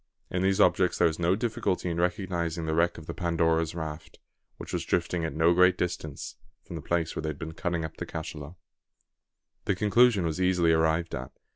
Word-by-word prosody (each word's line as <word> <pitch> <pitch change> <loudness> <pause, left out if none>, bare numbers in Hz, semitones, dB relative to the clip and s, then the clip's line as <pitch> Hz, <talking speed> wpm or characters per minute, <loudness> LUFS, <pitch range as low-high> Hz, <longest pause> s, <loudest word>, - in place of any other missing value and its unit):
In 90 - -1
these 95 +1 +2
objects 90 -3 +3
there - - +5
was 80 0 -3
no 85 +2 +2
difficulty 110 -5 -1
in 85 -1 -2
recognising 85 -2 -1
the 80 - -1
wreck 85 +2 +2
of 80 - -10
the - - -5
Pandora's 80 -2 0
raft, 80 -1 -6 0.4
which - - -8
was - - -1
drifting 85 0 -1
at 80 - -3
no 80 +2 +4
great 90 +1 +5
distance 80 -4 -4 0.3
from - - -9
the - - -5
place 85 -2 -1
where - - -2
they 80 - -3
had 75 - -5
been 80 +1 -6
cutting 85 0 -2
up 80 - -9
the - - -5
cachalot. 80 0 -7 1.1
The 100 - +1
conclusion 105 0 +4
was 80 +3 -2
easily 90 -2 +3
arrived 80 +1 +1
at. 65 -1 -4
85 Hz, 200 wpm, -28 LUFS, 80-90 Hz, 1.1 s, there